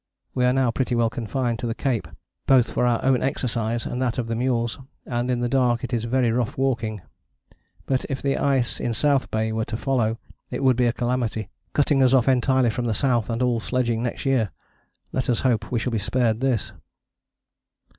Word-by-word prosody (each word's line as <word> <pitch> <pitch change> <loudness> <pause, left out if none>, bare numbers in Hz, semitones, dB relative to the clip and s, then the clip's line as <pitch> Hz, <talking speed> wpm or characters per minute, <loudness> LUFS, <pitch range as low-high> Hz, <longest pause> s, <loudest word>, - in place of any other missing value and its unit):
We 125 - +1
are 125 - +4
now 130 -2 +2
pretty 125 0 -1
well 115 -1 +2
confined 120 0 -2
to 120 - -3
the 115 - -2
cape 125 -5 -1 0.4
both 130 -3 +4
for 125 - +1
our 120 0 +1
own 130 -2 +3
exercise 120 -3 -1
and 125 - -3
that 125 -1 0
of 125 - -1
the 115 - -3
mules, 120 -1 0 0.3
and 120 0 -2
in 125 -1 0
the 120 - +1
dark 125 -1 +2
it 130 - -4
is 115 -1 0
very 120 0 +2
rough 120 -1 -1
walking. 115 -6 -1 0.8
But 130 -1 0
if 135 -2 -2
the 140 -1 0
ice 135 -4 0
in 120 -2 -2
South 140 +2 +2
Bay 110 0 -1
were 110 0 -1
to 110 0 -4
follow, 115 -4 0 0.3
it - - -4
would 130 -2 +5
be 125 0 +2
a - - +3
calamity, 120 -4 -2 0.2
cutting 145 -1 +3
us 130 0 +5
off 125 -1 +3
entirely 130 -1 +3
from 120 +2 -3
the 115 -2 0
south 120 -2 +1
and 115 +2 -1
all 120 -2 +2
sledging 120 -1 0
next 120 +2 -3
year. 130 -6 +2 0.6
Let 130 -2 -2
us 120 - +1
hope 115 -4 0
we 125 - +1
shall 120 +2 -1
be 115 - 0
spared 115 +2 0
this." 130 -4 0
120 Hz, 210 wpm, -24 LUFS, 115-130 Hz, 0.8 s, would